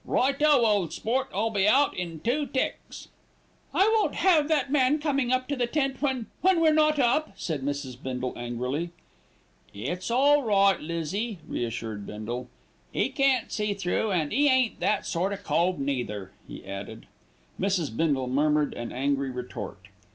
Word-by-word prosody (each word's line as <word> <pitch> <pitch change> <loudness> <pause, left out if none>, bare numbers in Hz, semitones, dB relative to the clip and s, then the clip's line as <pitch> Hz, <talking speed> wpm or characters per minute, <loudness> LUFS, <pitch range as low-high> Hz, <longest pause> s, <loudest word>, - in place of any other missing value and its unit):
"Righto, 275 -1 +3
ole 205 -6 +2
sport. 255 - -1
I'll 220 +4 0
be 200 -1 +2
out 275 +6 +4
in 170 -3 -5
two 280 +5 0
ticks." 260 - -4 0.6
"I - - +3 0.2
won't - - 0
have 325 -6 +4
that 290 -4 +1
man 280 0 +3
coming 275 -5 0
up 255 0 +1
to 285 - 0
the 245 -2 0
tent 270 0 -1
when 265 -5 0 0.2
when 375 -2 +4
we're 320 -1 +4
not 305 0 +3
up," 275 +4 +2
said 155 -5 -3
Mrs. 135 -2 -4
Bindle 130 -1 -3
angrily. 125 +7 -3 0.9
"It's 175 - -4
all 285 +5 +4
right, 200 -5 +3
Lizzie," 170 +7 -3
reassured 115 -3 -4
Bindle, 120 +4 -5 0.5
"'e - - +1
can't 275 -3 +1
see 210 -2 -1
through 195 +3 -1
an' 160 -6 0
'e 290 +1 +3
ain't 260 -3 +2
that 210 0 0
sort 185 +2 -1
o' - - -4
cove 185 -2 0
neither," 120 -9 -3 0.2
he - - -10
added. 100 +3 -7 0.5
Mrs. 185 - 0
Bindle 140 -3 +1
murmured 150 +3 +1
an 120 - -6
angry 140 +1 -1
retort. 120 -7 -7
195 Hz, 160 wpm, -27 LUFS, -, 0.9 s, out